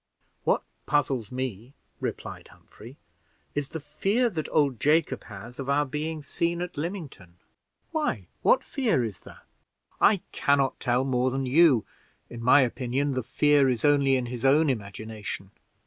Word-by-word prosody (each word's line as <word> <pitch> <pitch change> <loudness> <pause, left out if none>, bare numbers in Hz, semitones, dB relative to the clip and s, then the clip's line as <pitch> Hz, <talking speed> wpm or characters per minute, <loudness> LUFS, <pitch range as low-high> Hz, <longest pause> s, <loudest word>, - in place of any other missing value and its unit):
"What - - +2 0.2
puzzles 135 -6 0
me," 125 -1 -5 0.2
replied - - -5
Humphrey, 120 +6 -15 0.6
"is, 145 -1 -2
the 160 - -5
fear 200 - 0
that 160 -5 -4
old 140 -6 +2
Jacob 155 +7 +2
has 115 +4 -10
of 135 0 -4
our 145 +1 +3
being 150 +2 -4
seen 170 +4 -1
at 180 0 -7
Lymington." 150 - -6 0.6
"Why, 315 -2 -1 0.2
what - - +4
fear 230 - 0
is 105 -5 -7
there?" - - -14 0.6
"I 200 -4 +4
can 140 0 +2
not 135 -1 0
tell 125 0 +1
more 130 -1 +1
than 135 +1 -2
you; 135 -3 +5 0.5
in 120 - -7
my 125 +4 +6
opinion, 130 +2 -1
the 130 - -1
fear 145 +3 +3
is 125 +2 -1
only 140 -2 +4
in 130 -1 0
his 120 0 -6
own 145 +2 +4
imagination. 105 -2 -6
135 Hz, 155 wpm, -27 LUFS, 125-150 Hz, 0.6 s, my